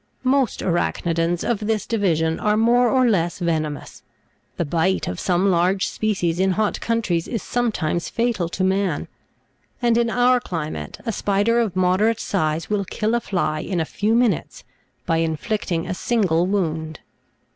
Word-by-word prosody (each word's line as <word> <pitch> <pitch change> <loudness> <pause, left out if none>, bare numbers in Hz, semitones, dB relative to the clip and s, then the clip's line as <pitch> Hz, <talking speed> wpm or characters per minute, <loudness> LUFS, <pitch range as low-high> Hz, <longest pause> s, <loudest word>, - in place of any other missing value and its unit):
21. 270 +2 +4
Most 255 - -3
Arach'nidans 170 -1 0
of 235 -4 0
this 215 0 -1
divi 200 -7 +1
sion 160 +1 -1
are 210 0 +1
more 240 +2 +4
or 255 -1 +3
less 175 -6 +1
venomous; 155 -4 -3 0.6
the 170 - 0
bite 170 +5 0
of 90 - -4
some 185 +2 +2
large 185 +2 +2
species 185 -6 -1
in 190 0 +2
hot 215 +2 0
coun 230 0 0
tries 170 -5 -1
is 230 -5 -3
sometimes 195 -9 -1
fatal 230 -8 -1
to 185 - -2
man; 190 -4 0 0.7
and 235 -2 +2
in 235 -1 +1
our 245 +1 +3
climate, 155 - -5
a 230 - 0
spider 205 +3 +1
of 215 -6 0
moderate 185 +5 +2
size 155 -4 -1
will 210 -1 0
kill 215 +4 -2
a 235 - +1
fly 155 -7 -1
in 180 +2 -2
a 160 - 0
few 210 +7 0
minutes 235 -8 0 0.4
by 165 - +1
in 165 -1 0
flicting 180 -3 -2
a - - -3
single 180 -5 +1
wound. 160 -5 -2
190 Hz, 170 wpm, -22 LUFS, 165-225 Hz, 0.7 s, 21